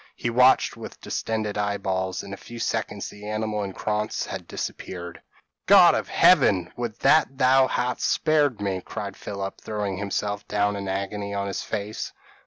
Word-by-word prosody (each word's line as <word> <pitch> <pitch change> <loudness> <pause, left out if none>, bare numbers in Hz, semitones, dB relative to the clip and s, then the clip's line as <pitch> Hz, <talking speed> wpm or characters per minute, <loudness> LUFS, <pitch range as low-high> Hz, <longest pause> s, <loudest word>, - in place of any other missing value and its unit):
He 120 - -2
watched 125 +2 +4
with - - -9
distended 110 -2 -3
eyeballs; 95 -2 -1
in 100 - -8
a - - -3
few 120 +3 -11
seconds 110 -3 -2
the 105 +1 -9
animal 110 0 -2
and 95 -2 -5
Krantz 105 0 -2
had - - -7
disappeared! 85 -1 -6 0.5
"God - - +8
of - - -2
Heaven! 90 -3 +4
would 120 -3 -4
that 140 -4 +4
thou 130 0 +5
hadst 125 -1 -1
spared 145 -7 +2
me 100 -2 -1
this," 90 - -9
cried - - -6
Philip, 100 -1 -6
throwing 105 -3 -3
himself 100 +1 -3
down 105 0 +1
in 100 -1 -5
agony 100 +1 -3
on 100 0 -1
his 100 - -3
face. 105 0 -4
105 Hz, 170 wpm, -25 LUFS, 100-115 Hz, 0.5 s, God